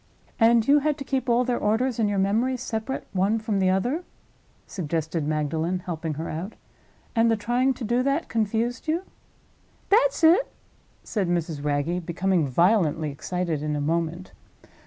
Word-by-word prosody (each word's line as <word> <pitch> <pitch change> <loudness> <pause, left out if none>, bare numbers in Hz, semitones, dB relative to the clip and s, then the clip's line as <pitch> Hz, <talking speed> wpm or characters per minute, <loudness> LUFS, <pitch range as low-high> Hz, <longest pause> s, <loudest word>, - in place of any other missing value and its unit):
"And 230 -1 +4
you 290 +1 +6
had 300 0 0
to 280 - -5
keep 265 -1 -2
all 240 +1 +4
their 245 -1 -1
orders 235 +3 0
in 220 - +3
your 205 - -1
memory, 220 +7 +1
separate 245 +1 -4
one 195 +4 +2
from 215 -2 -1
the 190 -1 +3
other?" 245 - 0 0.6
suggested 160 -3 -3
Magdalen, 155 +3 -1
helping 160 -3 -3
her 160 +3 -4
out. 175 +7 -5 0.6
"And 230 0 +4
the 225 - +3
trying 245 +5 +1
to 250 - -7
do 240 +3 +1
that 275 +5 0
confused 230 +4 -1
you?" 330 +4 0 0.9
"That's 475 -2 +3
it!" 345 +9 +5 0.5
said 200 -5 -2
Mrs. 165 -4 -2
Wragge, 150 +5 -1
becoming 175 -1 0
violently 160 - +2
excited 170 +1 -3
in 150 0 -2
a - - -1
moment. 165 +4 -2
205 Hz, 160 wpm, -25 LUFS, 165-245 Hz, 0.9 s, you